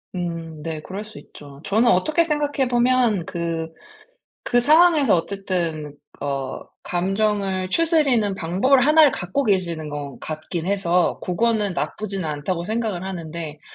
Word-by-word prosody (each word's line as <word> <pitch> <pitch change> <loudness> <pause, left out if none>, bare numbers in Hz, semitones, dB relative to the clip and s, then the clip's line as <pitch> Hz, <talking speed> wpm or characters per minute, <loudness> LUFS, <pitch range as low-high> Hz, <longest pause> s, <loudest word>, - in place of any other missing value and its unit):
음. 165 -3 -5
네. 155 -1 -5
그럴 195 +5 -6
수 215 0 -13
있죠. 140 -1 -14
저는 220 +6 +2
어떻게 305 - +3
생각해 290 -3 0
보면 240 -6 +2
그 165 -2 -3 0.7
그 245 - +2
상황에서 305 - +5
어쨌든 170 -5 -3 0.3
어 135 -2 -3 0.2
감정을 195 0 -1
추스리는 275 - +2
방법을 200 +11 +2
하나를 305 -2 +6
갖고 190 +10 -2
계시는 170 -7 -1
것 145 -2 -6
같긴 160 +2 -5
해서 180 -3 +1
고거는 210 +1 0
나쁘지는 195 0 -3
않다고 155 +3 -3
생각을 215 -4 -2
하는데 165 -4 -6
190 Hz, 290 characters per minute, -22 LUFS, 165-235 Hz, 0.7 s, 하나를